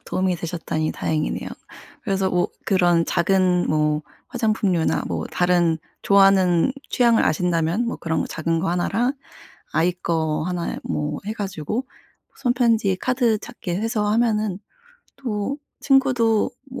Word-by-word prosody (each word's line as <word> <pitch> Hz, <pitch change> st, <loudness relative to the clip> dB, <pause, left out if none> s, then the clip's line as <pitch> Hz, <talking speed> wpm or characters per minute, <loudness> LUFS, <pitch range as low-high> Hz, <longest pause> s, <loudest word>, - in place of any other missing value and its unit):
도움이 185 Hz, -1 st, 0 dB
되셨다니 160 Hz, -2 st, -3 dB
다행이네요. 155 Hz, -1 st, -2 dB, 0.5 s
그래서 195 Hz, -4 st, 0 dB
뭐 180 Hz, -1 st, +1 dB, 0.2 s
그런 175 Hz, -3 st, +3 dB
작은 180 Hz, 0 st, +2 dB
뭐 150 Hz, 0 st, +1 dB, 0.3 s
화장품류나 215 Hz, -8 st, +1 dB
뭐 -, -, -3 dB
다른 175 Hz, -2 st, +2 dB, 0.2 s
좋아하는 195 Hz, +1 st, +4 dB, 0.2 s
취향을 235 Hz, -3 st, +4 dB
아신다면 170 Hz, +6 st, +1 dB
뭐 -, -, -3 dB
그런 160 Hz, -1 st, -2 dB
거 -, -, -1 dB
작은 165 Hz, +1 st, -1 dB
거 190 Hz, -, -1 dB
하나랑 225 Hz, +9 st, 0 dB, 0.6 s
아이 175 Hz, +2 st, +2 dB
거 160 Hz, -3 st, -1 dB
하나에 175 Hz, -1 st, -3 dB
뭐 150 Hz, 0 st, -2 dB
해 215 Hz, -, -2 dB
가지고 205 Hz, -, -4 dB, 0.5 s
손 245 Hz, -, +1 dB
편지에 225 Hz, -6 st, +2 dB
카드 245 Hz, -4 st, +1 dB
작게 200 Hz, -6 st, -6 dB
해서 215 Hz, 0 st, -1 dB
하면은 215 Hz, -3 st, +1 dB, 0.6 s
또 240 Hz, -1 st, -3 dB, 0.2 s
친구도 250 Hz, -6 st, +3 dB, 0.2 s
뭐 260 Hz, -, -7 dB
190 Hz, 280 characters per minute, -22 LUFS, 170-225 Hz, 0.6 s, 좋아하는